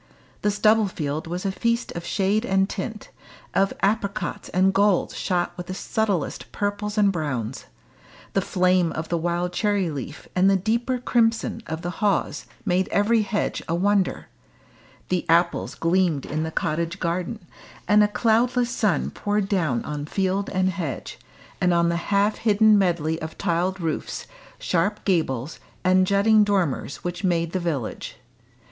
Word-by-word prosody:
The 210 - +2
stubble 215 +1 +3
field 155 -3 -4
was 180 +3 -4
a 195 - +1
feast 235 +4 -1
of 170 - -6
shade 200 +4 +1
and 195 -4 +2
tint, 215 +2 -6 0.4
of 195 0 +2
apricots 200 -1 -1
and 190 +1 +3
golds 200 -1 +2
shot 175 -2 -1
with 175 0 -7
the 185 - -4
subtlest 200 -6 -2
purples 205 +1 -2
and 205 -2 +4
browns; 135 - -3 0.7
the 195 - +2
flame 180 -2 +2
of 160 +1 -5
the 170 - +1
wild 175 +1 -1
cherry 200 -3 +1
leaf 140 -4 -7
and 185 +2 +4
the 195 - +4
deeper 230 +6 0
crimson 230 -2 +1
of 160 +1 -5
the 175 - -2
haws 205 -3 0 0.2
made 180 +1 +1
every 220 +3 +2
hedge 210 0 -1
a 165 - 0
wonder; 200 +1 +1 0.8
the 180 -1 0
apples 170 +1 +2
gleamed 165 -4 +1
in 155 +1 -2
the 160 - -2
cottage 170 +3 -2
garden; 180 +3 -3 0.4
and 210 0 +6
a - - +4
cloudless 240 +3 +2
sun 205 - 0
poured 205 -1 -1
down 160 - 0
on 150 0 -4
field 195 +2 -1
and 185 -1 +1
hedge, 165 -7 -5 0.4
and 180 -1 +3
on 170 0 +3
the 170 - 0
half 205 +1 +2
hidden 215 -1 +5
medley 170 -4 +1
of 160 0 -6
tiled 180 +3 0
roofs, 160 -3 -3 0.3
sharp 200 +5 -1
gables, 155 - 0 0.2
and 185 0 +4
jutting 210 +2 +5
dormers 185 -9 -1
which 175 +3 -4
made 170 -3 +1
the 185 - -1
village. 155 -9 -3
185 Hz, 155 wpm, -24 LUFS, 170-205 Hz, 0.8 s, and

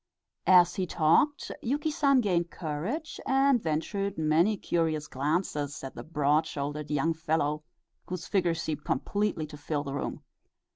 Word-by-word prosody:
As 180 -2 +7
he 185 -1 0
talked 170 - +2
Yuki 290 +6 -1
San 275 -3 +3
gained 175 -5 +1
courage, 180 - -4
and 270 -2 +4
ventured 195 +5 -2
many 160 +7 +3
curious 160 -4 -1
glances 145 0 -2
at 135 - -6
the - - -7
broad 150 0 +1
shouldered 145 0 -4
young 150 +3 +1
fellow, 155 -2 -1 0.4
whose 180 -2 -5
figure 180 -4 +1
seemed 160 -2 -3
completely 200 +3 -1
to 150 0 -10
fill 145 0 -2
the 140 -2 -5
room. 140 - -4
160 Hz, 145 wpm, -29 LUFS, 150-200 Hz, 0.4 s, As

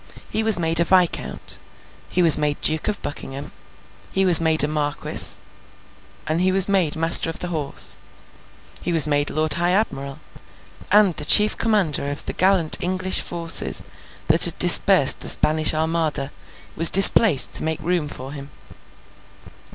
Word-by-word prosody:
He 220 - -3
was 220 -2 +3
made 165 -1 -2
a - - +1
viscount, 180 0 -4 0.5
he 180 - -3
was 165 -3 +5
made 150 -1 -5
Duke 155 0 -3
of 210 - -5
Buckingham, 140 -1 -10 0.6
he 195 0 -2
was 175 -3 +8
made 160 -2 0
a - - -2
marquis, 150 -1 -2 1.0
he 185 +1 -1
was 190 0 +3
made 190 -6 -3
Master 165 0 +2
of 165 - -9
the 180 - -8
Horse, 150 -5 -1 0.8
he 175 - -6
was 165 -4 +4
made 145 -1 -3
Lord 155 -1 -2
High 175 +3 -3
Admiral—and 185 +3 -5
the 150 - -5
Chief 210 +5 +4
Commander 190 -11 -3
of 145 - -5
the - - -7
gallant 185 -4 0
English 185 +1 -3
forces 170 -1 +1 0.4
that - - +5
had - - -1
dispersed - - +5
the - - -7
Spanish 155 0 +1
Armada, 155 -3 -4 0.4
was 165 +1 +4
displaced 195 - +5
to - - -2
make 160 0 -6
room 170 -1 -5
for 135 -2 -11
him. 140 -1 -12
165 Hz, 150 wpm, -18 LUFS, 150-185 Hz, 1.0 s, was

